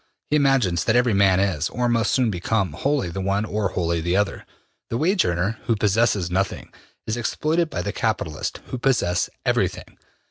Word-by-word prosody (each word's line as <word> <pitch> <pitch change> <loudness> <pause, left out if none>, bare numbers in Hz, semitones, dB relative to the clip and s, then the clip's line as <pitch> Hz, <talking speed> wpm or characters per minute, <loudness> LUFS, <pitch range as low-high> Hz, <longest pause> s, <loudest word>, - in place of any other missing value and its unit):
He - - +4
imagines 135 - +2
that 110 - +2
every 125 -2 +3
man 95 -2 +4
is, 85 -5 0
or 125 +2 -1
must 115 -3 +1
soon 125 -4 +2
become, 95 +2 -1
wholly 140 -11 -1
the 95 - -4
one 100 +2 0
or 105 -2 -1
wholly 85 -2 0
the 85 +2 0
other. 105 0 -1 0.4
The 115 - -1
wage 185 +7 +2
earner, 90 +5 -1
who 115 - +3
possesses 105 -3 +1
nothing, 95 +2 -2 0.3
is 110 +2 -2
exploited 155 +8 0
by 90 - -3
the 100 +3 -3
capitalists, 95 -9 -2
who 130 - -4
possess 120 -10 +1 0.2
everything. - - -1
105 Hz, 180 wpm, -23 LUFS, 90-120 Hz, 0.4 s, He